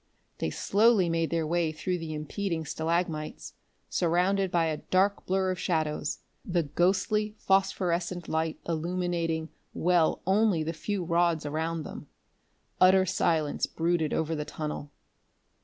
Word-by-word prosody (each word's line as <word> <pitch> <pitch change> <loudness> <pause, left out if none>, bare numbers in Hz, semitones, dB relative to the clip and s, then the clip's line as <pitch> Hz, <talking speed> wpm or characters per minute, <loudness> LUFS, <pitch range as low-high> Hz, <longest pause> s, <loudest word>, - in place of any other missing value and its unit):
They - - -1
slowly 205 - +3
made 165 -1 0
their 165 -1 0
way 165 0 +1
through 180 +3 -2
the 160 -1 -5
impeding 160 +2 -3
stalagmites, 160 -1 -2 0.3
surrounded 185 +3 +1
by 170 -2 +2
a 155 -1 -1
dark 195 +5 +1
blur 190 0 +1
of 185 - -4
shadows, 155 -3 -1 0.2
the 175 -2 0
ghostly 195 +7 +1
phosphorescent 180 -3 0
light 160 0 -1
illuminating 170 -1 -1 0.3
well 175 -2 +2
only 195 -3 +3
the 165 +2 -3
few 195 +4 -3
rods 170 -2 +1
around 160 +2 -2
them. - - -9 0.7
Utter 185 +1 +6
silence 160 -4 +1
brooded 165 -1 0
over 160 0 0
the 150 -2 -2
tunnel. 150 -1 -5
170 Hz, 130 wpm, -28 LUFS, 160-185 Hz, 0.7 s, Utter